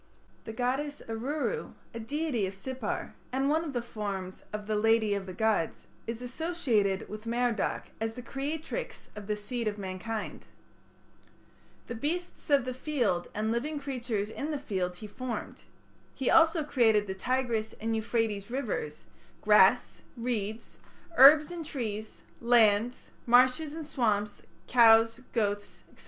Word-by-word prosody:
The - - -5
goddess 265 +6 -2
Aruru, 285 - -3 0.2
a 230 - -5
deity 245 -3 -1
of 190 - -7
Sippar, 255 +2 -4 0.2
and 270 +2 +1
one 320 +2 +2
of 315 - -4
the 240 -2 -2
forms 200 -5 -5
of 210 0 -5
"the 215 0 -1
lady 220 0 +3
of 195 -1 -3
the 185 - -6
gods 220 -5 0
", - - -32
is 230 +1 -4
associated 245 - 0
with 215 +2 -8
Merodach 235 -2 -1
as 225 0 -2
the 250 - -7
creatrix 305 - -5
of 210 -1 -8
the 210 - 0
seed 230 +2 -4
of 210 -1 -2
mankind. 200 +3 -5 1.4
"The - - -6
beasts 320 +11 -4
of 280 -4 +4
the 255 - -3
field 245 - -1
and 215 +1 0
living 290 +6 -2
creatures 240 -7 -3
in 290 +6 -4
the 300 - -1
field 185 -10 -2
he 195 - -9
formed." 240 +4 -6 0.5
He 265 - 0
also 325 -1 +5
created 225 -7 +3
the 190 - -4
Tigris 235 +1 -1
and 225 +1 -1
Euphrates 220 -2 -1
rivers, 450 - -3 0.4
grass, - - +5 0.2
reeds, 230 -2 -4 0.4
herbs 300 +4 +8
and 345 -2 -5
trees, 220 -8 -5 0.2
lands, 235 0 +3 0.2
marshes 255 +5 +4
and 320 -1 -6
swamps, 210 -8 0 0.2
cows, 225 -1 +6
goats, 205 -3 -2
&c. - - -22
235 Hz, 145 wpm, -29 LUFS, 210-275 Hz, 1.4 s, herbs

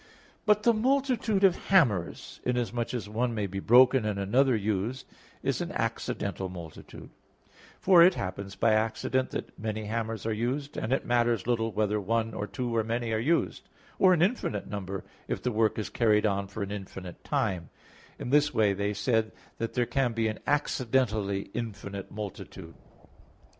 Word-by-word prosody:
But 210 0 +4
the 235 - +5
multitude 245 -4 +1
of 190 -2 +3
hammers, 120 - +2
inasmuch 120 -1 -1
as 120 -5 -4
one 115 +3 -1
may 105 -2 -1
be 95 0 -4
broken 125 +4 +6
and 105 -2 -1
another 125 +7 +3
used, 110 +4 -2 0.4
is - - 0
an - - -3
accidental 95 -1 -2
multitude; 85 -4 -10 0.7
for 180 -2 +6
it 180 +2 +7
happens 100 +1 -5
by 115 - +3
accident 115 +4 0
that - - -6
many 110 0 -3
hammers 110 -1 -3
are 110 - 0
used, 130 +6 -2
and 115 - -3
it 135 - +1
matters 120 -4 +2
little 115 -2 0
whether 105 0 0
one 115 +2 0
or 105 - -4
two, 120 -1 -3
or 110 - +2
many 115 +1 -2
are 110 - +1
used, 160 +9 0 0.3
or 185 - +6
an 175 -2 +4
infinite 185 - -1
number, 95 -2 -5 0.2
if - - -3
the 125 - 0
work 110 -1 +1
is 110 - -3
carried 110 -3 +3
on 100 -1 0
for 100 +1 -5
an 100 - -5
infinite 95 -3 -8
time. 90 -4 -1 0.5
In 125 - -5
this 145 0 +4
way 110 -5 +3
they 100 +1 -2
said 110 0 +1 0.3
that 115 - -3
there 120 -1 +2
can 120 0 0
be 115 -1 0
an 110 - -3
accidentally 115 -9 0
infinite 100 -4 -5
multitude. 95 -4 -8
115 Hz, 170 wpm, -28 LUFS, 100-130 Hz, 0.7 s, it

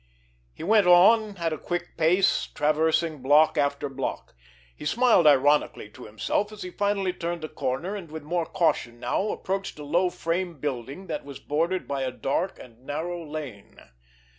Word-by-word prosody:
He - - -10
went 205 +1 +4
on 200 +4 +5
at 165 -2 -1
a 155 - -5
quick 175 0 -4
pace, 170 +4 +2
traversing 155 0 +1
block 145 +4 +4
after 140 -1 0
block. 135 -1 -5 0.4
He - - -11
smiled 225 0 +4
ironically 145 -6 +3
to - - -12
himself, 110 - -1
as 215 -1 -8
he 180 - -7
finally 200 -1 0
turned 170 -2 -4
a - - -3
corner, 150 +6 -3
and 185 -6 -8
with 160 -1 -7
more 170 +2 -2
caution 160 -10 0
now, 200 - -1
approached 195 -2 -3
a 150 - -8
low 175 +5 +1
frame 170 -1 -3
building 140 +5 -4
that 155 -4 -4
was 140 -1 -9
bordered 170 +5 -1
by 140 -1 -2
a 130 - -1
dark 135 +8 -2
and 120 0 -15
narrow 165 +5 -4
lane. 145 -10 -8
160 Hz, 170 wpm, -26 LUFS, 145-185 Hz, 0.4 s, on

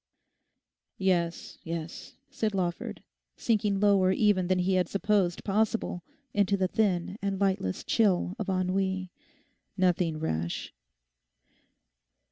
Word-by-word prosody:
'Yes, 175 -3 -1
yes,' 165 0 -6 0.2
said 215 -2 -1
Lawford, 175 -2 -3 0.3
sinking 210 -3 +1
lower 195 -2 +4
even 190 -2 +2
than 185 0 +2
he 180 +1 +1
had 185 -1 +2
supposed 200 -3 +1
possible 215 -2 0 0.3
into 200 -1 +2
the 185 -1 +1
thin 195 -1 0
and 195 -1 -2
lightless 190 - 0
chill 190 -5 +2
of 210 - -3
ennui—'nothing 185 -2 -2
rash. 85 - -3
190 Hz, 100 wpm, -28 LUFS, 175-200 Hz, 0.3 s, lower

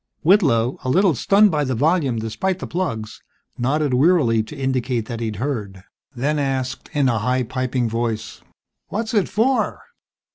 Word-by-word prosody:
Whitlow, 135 - +3
a 130 - -2
little 185 +5 +4
stunned 200 - +4
by 150 -2 +1
the 130 -2 -1
volume 145 -2 +1
despite 115 - -2
the - - -6
plugs, 115 -12 -4 0.3
nodded 140 +3 0
wearily, 130 -5 +3
to 130 +7 -9
indicate 130 -3 -1
that 115 0 -6
he'd 110 -2 -3
heard, 105 -6 -4 0.3
then 145 +5 0
asked, 135 -1 -2
in 145 -3 +2
a 115 -3 +1
high, 125 +3 0
piping 125 0 -2
voice, 115 -1 -3 0.5
"What's 220 +2 -3
it 205 -5 +2
for?" 255 +5 0
130 Hz, 155 wpm, -21 LUFS, 115-160 Hz, 0.5 s, little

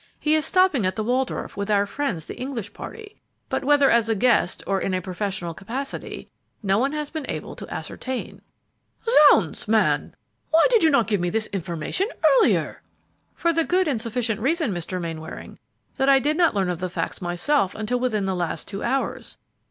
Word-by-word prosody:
"He 305 - +1
is 310 -1 +3
stopping 370 - +3
at 185 0 0
the 215 - -2
Waldorf, 250 +3 -1
with 200 +1 -4
our 205 -1 +3
friends, 205 - -3
the - - -7
English 240 -6 -5
party, 435 -2 -10 0.3
but - - -1
whether 285 0 +4
as 230 -1 +3
a 225 - +2
guest 225 -4 +2
or 195 -1 0
in 190 - -1
a - - 0
professional 185 -1 -4
capacity, 240 - -6 0.4
no 195 +1 +2
one 270 +3 +1
has 300 -1 -3
been 315 -3 -5
able - - -5
to - - -9
ascertain." 260 -1 -5 0.9
"Zounds, 195 - +2
man! 220 0 +2 0.3
why 325 +1 +5
did 460 -6 +4
you 320 - +6
not 240 -6 +3
give 205 -5 0
me 175 - 0
this 220 +3 -1
information 175 - -2 0.2
earlier?" - - +3 0.5
"For 340 -1 +1
the 330 0 +2
good 365 +2 +1
and 255 -7 0
sufficient 230 -2 -2
reason, 295 - +1
Mr. 175 +1 -4
Mainwaring, 165 -1 -7 0.4
that 270 +1 +2
I 275 - +7
did 295 +3 +1
not 335 -7 +3
learn 190 -2 +1
of 175 - -4
the 185 - -3
facts 180 - -4
myself 185 - 0
until 220 +3 -1
within 220 -5 0
the 190 - 0
last 175 -3 -3
two 200 -1 -6
hours. 265 +3 -2
225 Hz, 190 wpm, -24 LUFS, 190-285 Hz, 0.9 s, I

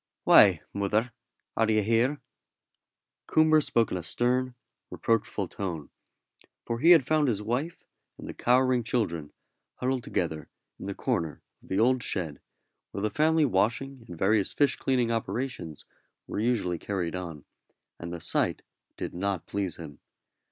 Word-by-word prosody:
"Why, 90 -7 +7
mother, 105 +4 0 0.4
are 115 -1 +2
you 110 -1 +3
here?" 115 +7 +1 1.1
Coomber 155 0 +4
spoke 115 -5 +1
in - - -1
a - - -4
stern, 125 +7 0 0.3
reproachful 110 -3 -1
tone, 85 -6 -5 0.7
for 115 0 -3
he 165 - +4
had 165 -7 +8
found 155 0 +2
his 105 -4 0
wife 130 +10 -3 0.3
and - - -9
the - - -6
cowering 125 0 +3
children 95 -11 -2 0.4
huddled 130 -1 -1
together 80 -7 -3 0.3
in - - -7
the - - -4
corner 80 -3 -2 0.2
of - - -20
the 95 - -1
old 125 +2 +3
shed 80 -10 -3 0.5
where 100 - -5
the 110 - 0
family 155 +4 +3
washing 125 +4 0
and 85 - -9
various 100 +3 +2
fish 145 -1 +3
cleaning 125 -3 0
operations 115 - -4 0.4
were - - -4
usually 105 -7 0
carried 90 -4 -3
on; 85 -5 -6 0.5
and 85 0 -6
the 85 - -5
sight - - 0 0.3
did - - -5
not 95 -1 -2
please 100 -3 -2
him. 75 -4 -10
110 Hz, 150 wpm, -28 LUFS, 90-125 Hz, 1.1 s, had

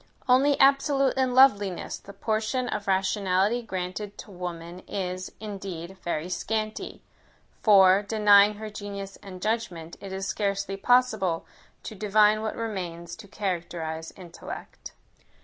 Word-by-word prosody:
Only 270 +3 +4
"absolute 275 0 +4
in 260 -2 +1
loveliness," 205 -9 +4
the 200 - -12
portion 220 +5 -1
of 210 -3 -4
rationality 195 +3 +1
granted 195 -1 -5
to - - -10
woman 175 -1 -6
is, 185 -1 -4
indeed, 190 -4 -7
very 170 -1 -2
scanty; 215 +3 -3 0.6
for, 195 -2 +6
denying 210 -1 +5
her 215 +1 -7
genius 200 -1 -7
and 185 -2 -10
judgment, 180 -6 -3
it 195 - -8
is 190 0 -4
scarcely 200 -1 -2
possible 215 -6 +2 0.4
to - - -7
divine 210 +1 +3
what 220 0 -3
remains 175 -6 -5
to 220 -2 -12
characterize 170 -5 -4
intellect. 175 -3 -9
200 Hz, 125 wpm, -26 LUFS, 185-220 Hz, 0.6 s, for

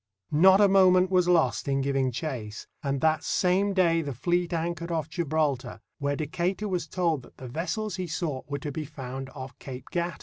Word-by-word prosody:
Not 190 +6 +6
a 205 - +7
moment 185 -1 +5
was 180 -1 +3
lost 170 -4 +2
in 135 0 +1
giving 135 -1 +1
chase, 120 -6 -5 0.2
and 140 -3 -2
that 155 -1 +2
same 190 +2 +2
day 170 -4 +3
the 140 -4 -5
fleet 175 +6 0
anchored 170 0 -2
off 160 -3 -1
Gibraltar, 150 -7 -1 0.2
where 140 0 0
Decatur 175 +7 -2
was 180 -3 -2
told 170 -6 0
that - - -18
the 130 - -8
vessels 185 - -3
he 185 -1 -3
sought 155 -5 -3
were 140 - -2
to 145 +1 -5
be 155 +3 -4
found 135 -3 -7
off 130 -1 -8
Cape 130 -1 -9
Gata. 175 0 -2
160 Hz, 195 wpm, -27 LUFS, 140-180 Hz, 0.2 s, a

